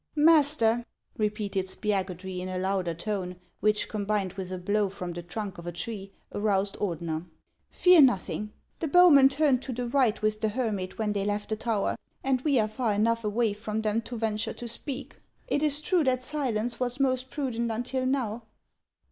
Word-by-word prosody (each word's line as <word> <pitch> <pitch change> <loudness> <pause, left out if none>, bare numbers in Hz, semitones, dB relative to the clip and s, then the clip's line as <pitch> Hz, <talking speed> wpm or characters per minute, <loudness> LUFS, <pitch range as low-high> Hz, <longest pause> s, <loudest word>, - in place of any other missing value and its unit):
Master," 295 -7 +5 0.3
repeated 210 -3 -1
Spiagudry, 190 -2 -2
in 185 +1 -5
a 185 - -3
louder 185 -2 -1
tone, 180 0 -3 0.2
which, 215 0 +2
combined 205 -3 -1
with 190 -2 -6
a 185 - -3
blow 205 +3 0
from 180 -2 -6
the 175 - -5
trunk 195 +2 -6
of 170 - -9
a - - -2
tree, 195 +3 -5 0.2
aroused 205 -1 0
Ordener, 170 -3 -3 0.3
" - - -47
fear 360 -3 +6
nothing. 210 -4 +2 0.3
The 325 - -1
bowmen 295 -5 +7
turned 275 -2 +2
to 270 - -5
the 245 0 -3
right 240 -4 +2
with 215 0 -1
the 220 - +1
hermit 210 -5 -2
when 215 -2 0
they 200 -1 -1
left 205 +1 -2
the 215 - 0
tower, 220 -2 -1 0.3
and 265 -2 +1
we 280 -3 +2
are 215 - +2
far 220 0 -1
enough 230 +2 +1
away 215 +1 +1
from 215 +1 -4
them 215 +1 +1
to 240 +1 -7
venture 215 -1 -1
to 240 - -7
speak. 260 +4 -5 0.3
It 285 - 0
is 295 -1 +3
true 345 +1 +2
that 255 -1 +1
silence 245 -5 -1
was 250 +1 -2
most 260 -1 +1
prudent 245 -6 -2
until 255 +3 -2
now." 240 -4 -1
215 Hz, 185 wpm, -28 LUFS, 200-255 Hz, 0.3 s, bowmen